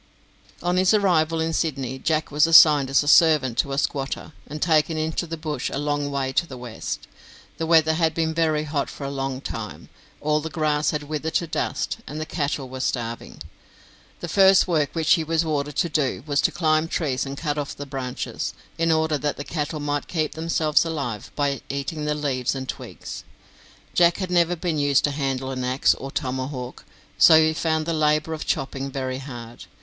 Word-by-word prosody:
On 180 +1 +1
his 185 +3 +4
arrival 165 -5 +2
n 165 0 -2
Sydney, 135 -6 -2
Jack 155 +2 0
was 150 +2 +4
assigned 150 -4 +7
as 135 +1 +3
a - - -7
servant 150 -5 +5
to 140 - +1
a 135 - -2
squatter, 140 +1 -2
and 150 - -6
taken 155 0 +2
into 160 +2 -2
the 165 +1 -5
bush 155 -1 -3
a - - -3
long 145 0 -1
way 135 -1 -2
to 170 - +1
the 130 - -9
west. 120 -2 -6 0.5
The 165 - -2
weather 160 -1 +5
had 160 -1 +1
been 160 -1 0
very 155 -2 +1
hot 145 -2 -2
for - - -9
a 140 - -3
long 135 -1 -3
time, 110 -6 -7 0.3
all 150 0 +1
the 160 - -5
grass 155 -1 0
had 150 -1 -2
withered 155 +2 -4
to 170 - +2
dust, 160 - -2
and 150 +2 -6
the 155 - -3
cattle 145 -4 -2
were 130 +1 -8
starving. 120 -3 -4 0.8
The 175 - -4
first 190 +3 +5
work 155 -5 +1
which 160 -2 +3
he 165 - +2
was 165 +1 0
ordered 145 -2 -2
to 170 - +1
do 145 -6 -1
was 145 -2 +1
to - - +2
climb 155 -2 +1
trees 140 -6 -1
and 140 0 -6
cut 150 -1 -2
off 145 - -4
the 145 - -7
branches, 130 -2 -4 0.2
in 165 0 +2
order 160 -2 +1
that 145 0 -2
the 145 - -4
cattle 150 0 -3
might 145 0 -2
keep 155 -3 -1
themselves 160 0 +1
alive 140 -10 -4
by 140 -2 0
eating 140 +2 -3
the 150 0 0
leaves 135 -4 -1
and 130 -1 -5
twigs. - - -7 0.7
Jack 170 -1 +4
had 185 -2 -4
never 175 0 +3
been 165 -3 -2
used 145 -2 +3
to 145 - +2
handle 135 -2 -2
an 130 -1 -3
axe 130 +2 +3
or 135 - -7
tomahawk, 130 -2 -4 0.3
so 160 -1 +8
he 160 0 +3
found 160 -1 0
the 165 - -1
labour 155 0 +1
of 155 - -6
chopping 135 0 -2
very 130 -1 -3
hard. 120 -4 -9
150 Hz, 200 wpm, -24 LUFS, 135-160 Hz, 0.8 s, so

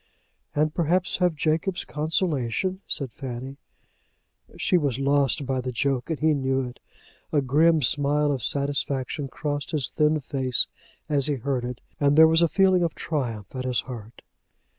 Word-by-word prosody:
"And 150 +1 +1
perhaps 175 +3 +1
have 180 -3 +1
Jacob's 165 +5 -1
consolation," 155 - -1
said 135 -4 -2
Fanny. 130 0 -7 1.0
She - - +1
was 140 -8 +1
lost 140 0 +1
by 130 -1 -1
the 125 0 -4
joke 130 +2 -1
and 160 - -2
he 155 0 +3
knew 135 -1 0
it. 125 - -11 0.5
A 150 - +3
grim 155 +4 +3
smile 145 +2 +2
of 130 -5 -3
satisfaction 140 +1 -1
crossed 145 +2 -4
his 150 -5 -1
thin 155 0 +2
face 130 -3 +1 0.4
as 145 -2 +5
he 145 - 0
heard 130 0 -2
it, 125 0 -6 0.2
and 145 0 +3
there 160 0 +9
was 160 +1 +4
a 170 - +5
feeling 190 +1 +3
of 170 -2 -1
triumph 120 - -4
at 130 - -3
his 125 -2 0
heart. 115 -3 -10
145 Hz, 160 wpm, -25 LUFS, 130-155 Hz, 1.0 s, there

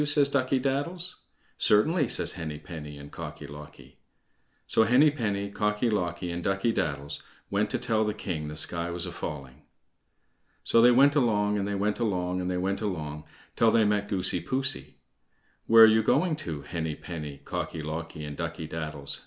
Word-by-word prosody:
says 145 -1 +4
Ducky 135 -1 +1
daddles. 165 +7 -2 0.4
"Certainly," 145 - +3
says - - 0
Henny 80 -5 -5
penny 75 -1 -8
and 70 0 -11
Cocky - - -7
locky. 75 +1 -12 0.7
So - - +3
Henny 125 +7 +5
penny, 100 -7 -2
Cocky 105 +3 0
locky, 90 -3 -2
and 85 0 -4
Ducky 95 +4 +1
daddles 70 -5 -2 0.3
went - - +1
to - - 0
tell 110 -1 +1
the 105 -1 -1
king 80 -8 -4
the 75 - -6
sky 85 +3 0
was 85 0 -3
a - - -5
falling. 70 -4 -7 1.0
So 115 - +4
they 120 - +8
went 140 +4 +5
along, 105 -6 +2
and 100 - -1
they 100 - -2
went 105 +3 0
along, 90 -5 -1
and 90 - -2
they 90 - -1
went 95 +3 -1
along 75 -7 -4 0.3
till 115 - +4
they 110 -1 +4
met 105 0 +1
Goosey 90 -2 0
poosey. 130 0 -2 0.7
"Where 115 0 +9
are - - +12
you 110 0 +5
going 155 +9 +2
to, 80 - -5
Henny 80 -1 -3
penny, 75 -4 -7
Cocky 80 +2 -5
locky, 80 0 -5
and 75 -1 -6
Ducky 85 -1 -4
daddles?" 75 -3 -5
95 Hz, 180 wpm, -28 LUFS, 80-115 Hz, 1.0 s, are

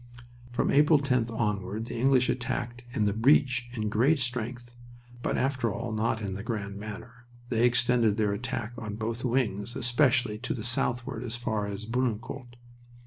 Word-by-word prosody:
"From 120 - +1
April 150 +2 +6
10th 125 -4 +1
onward 105 -2 -2
the - - -6
English 130 0 +4
attacked 120 -1 -2
in 120 -4 0
the 100 - +2
breach 125 0 +3
in 110 -3 -2
great 125 +9 +3
strength, 120 -1 -3 0.5
but - - 0
after 130 -4 +1
all 115 +3 -4
not 110 0 0
in 100 -2 -2
the 95 - -5
grand 100 -3 -4
manner; 115 +4 -9 0.2
they 120 0 +4
extended 120 -3 +3
their 105 -2 +2
attack 120 +1 -3
on 105 -2 -5
both 115 +2 -3
wings, 120 -3 0
especially 120 -3 +2
to 125 - -2
the 110 - -5
southward 120 -2 -1
as 120 -1 -4
far 110 -4 -2
as 100 +1 -5
Bullecourt. 120 +1 -2
120 Hz, 165 wpm, -28 LUFS, 110-125 Hz, 0.5 s, April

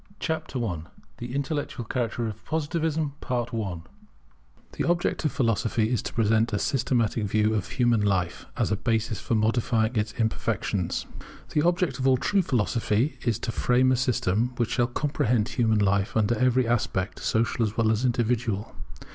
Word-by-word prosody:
CHAPTER 155 -6 -2
I 90 -7 -2 0.4
THE 120 +2 -5
INTELLECTUAL 140 -3 -2
CHARACTER 120 0 -2
OF 110 0 -7
POSITIVISM 160 -1 -1
[The 110 -9 -6
object 175 -1 0
of 150 - +2
Philosophy 115 -1 +1
is 120 - +1
to - - -6
present 115 0 +2
a 105 - 0
systematic 115 -2 0
view 105 +2 +2
of 105 -4 -1
human 120 -3 +2
life, 95 -4 0
as - - 0
a 105 - +1
basis 115 -1 -1
for 115 - -1
modifying 115 +1 +1
its 105 0 0
imperfections] 110 -5 -1 0.5
The 150 - +3
object 170 -5 +1
of 130 - +1
all 130 -1 +5
true 200 +9 +2
Philosophy 120 - 0
is 115 -4 +1
to - - -3
frame 125 +3 +3
a - - +4
system 120 -2 0
which 120 -1 0
shall 120 -1 +2
comprehend 120 -4 0
human 115 -3 +2
life 100 +1 +1
under 110 +2 +2
every 125 +1 +2
aspect, 105 -5 -1
social 115 +1 +1
as 110 -1 -2
well 110 -1 +3
as 110 +2 0
individual. 120 -4 0
115 Hz, 160 wpm, -26 LUFS, 110-130 Hz, 0.5 s, all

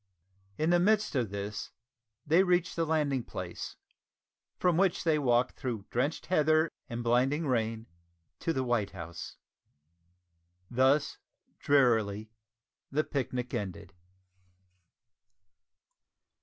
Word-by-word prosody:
In 160 +2 +1
the 175 - +5
midst 210 +3 +2
of 120 -6 +1
this 100 +1 -5 0.6
they 165 +5 +5
reached 180 -2 +1
the 165 -1 0
landing 145 -5 +1
place, - - -6 0.8
from 180 -2 +2
which 190 0 +2
they 160 -2 +2
walked 125 -2 +2
through 115 -6 -3
drenched 140 +6 -1
heather 155 -1 +3 0.2
and 120 -1 -4
blinding 130 +7 +2
rain 115 -4 -1 0.5
to 165 - -1
the 130 -4 -1
White 120 -6 0
House. 85 -2 -8 1.4
Thus, 135 +4 +2 0.4
drearily, 110 -6 +2 0.6
the 150 +3 +1
picnic 125 -4 -3
ended! 95 -2 -5
130 Hz, 105 wpm, -30 LUFS, 115-160 Hz, 1.4 s, the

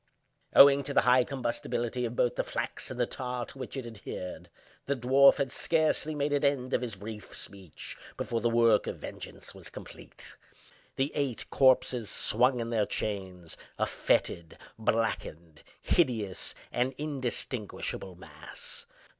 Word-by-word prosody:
Owing 140 0 +9
to 140 - -4
the - - +6
high 125 0 +5
combustibility 120 -1 -2
of 120 - -7
both 120 - +2
the - - 0
flax - - -3
and 130 - -7
the 120 - +3
tar 125 0 -4
to 135 - -12
which 130 +1 -6
it 130 - -4
adhered, 105 -5 -7 0.4
the 140 - +1
dwarf 135 +2 +6
had 140 -3 -1
scarcely 155 0 +1
made 145 0 0
an 145 - +1
end 135 -3 +1
of - - +2
his 120 -4 -3
brief 105 +2 -8
speech 95 -6 -8 0.2
before 115 -1 -2
the 120 - +2
work 115 -2 +4
of - - -3
vengeance - - -8
was - - -9
complete. - - -11 0.6
The 135 +2 0
eight 140 -5 -2
corpses 130 -4 +3
swung 125 0 +3
in 115 0 -3
their 110 -3 +1
chains, 95 -5 -4 0.2
a - - +2
fetid, 85 -2 0 0.2
blackened, 85 -8 -1 0.2
hideous, 115 - 0 0.2
and 125 +2 0
indistinguishable 125 -9 -3
mass. 90 - -9
120 Hz, 150 wpm, -30 LUFS, 110-135 Hz, 0.6 s, Owing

